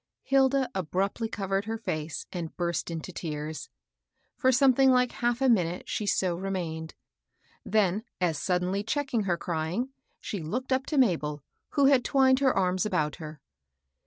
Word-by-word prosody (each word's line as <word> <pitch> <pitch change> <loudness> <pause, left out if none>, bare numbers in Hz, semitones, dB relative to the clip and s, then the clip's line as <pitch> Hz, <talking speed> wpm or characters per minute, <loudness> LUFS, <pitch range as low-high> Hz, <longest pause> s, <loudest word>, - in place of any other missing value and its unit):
Hilda 270 -1 +3
abruptly 195 +5 -1
covered 195 -1 -2
her 225 +1 -3
fece 160 -7 -4
and 170 -3 -5
burst 170 -1 -1
into 165 +2 -5
tears. 155 -2 -5 0.7
For 260 -1 +3
something 265 +1 +5
like 250 -1 +4
half 240 +1 -1
a 265 - +4
minute, 180 -7 +1
sk| 210 - -2
so 185 -2 +1
remained; 170 -4 -4 0.7
then 210 -1 +1 0.2
as 170 -5 0
suddenly 180 +2 0
checking 235 -1 -1
her 175 -3 +1
crying, 170 +9 -2 0.3
she 200 - -5
looked 250 +12 -2
up 260 +1 0
to 300 - -1
Mabd, 155 - +2 0.3
who 280 - +4
had 270 -3 +5
twined 265 -1 +4
her 270 -2 +4
arms 185 -2 +1
about 180 -8 -1
her. 155 -3 -9
195 Hz, 155 wpm, -28 LUFS, 170-250 Hz, 0.7 s, something